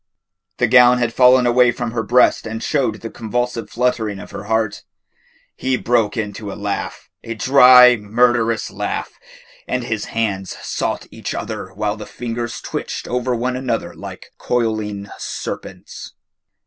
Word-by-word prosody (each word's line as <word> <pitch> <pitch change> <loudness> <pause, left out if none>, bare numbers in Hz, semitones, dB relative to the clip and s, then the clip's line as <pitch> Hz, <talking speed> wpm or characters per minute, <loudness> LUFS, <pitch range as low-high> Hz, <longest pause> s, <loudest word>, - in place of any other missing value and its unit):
The 125 - +3
gown 125 +1 +6
had 120 -2 -1
fallen 125 0 +5
away 120 0 +4
from 120 -2 -4
her 115 0 -1
breast 120 +1 +3
and 110 +1 -5
showed 130 -8 0
the 115 - -6
convulsive 120 0 -3
fluttering 115 -4 -1
of - - -10
her - - -7
heart. 110 -1 -1 0.7
He 130 0 -1
broke 115 -4 +1
into 105 -1 -4
a - - -7
laugh, 100 -1 -4 0.2
a 115 - -5
dry, 125 0 +7
murderous 115 +1 +1
laugh, - - -4 0.5
and 125 - -1
his 110 -3 -3
hands 100 -4 -3
sought - - -2
each - - -5
other - - -5
while 105 +1 -2
the 105 - -8
fingers 120 -1 -5
twitched - - -5
over 125 0 -1
one 125 +2 -1
another 125 -3 -2
like - - -10
coiling 110 -4 -2
serpents. - - -7
115 Hz, 150 wpm, -19 LUFS, 110-125 Hz, 0.7 s, dry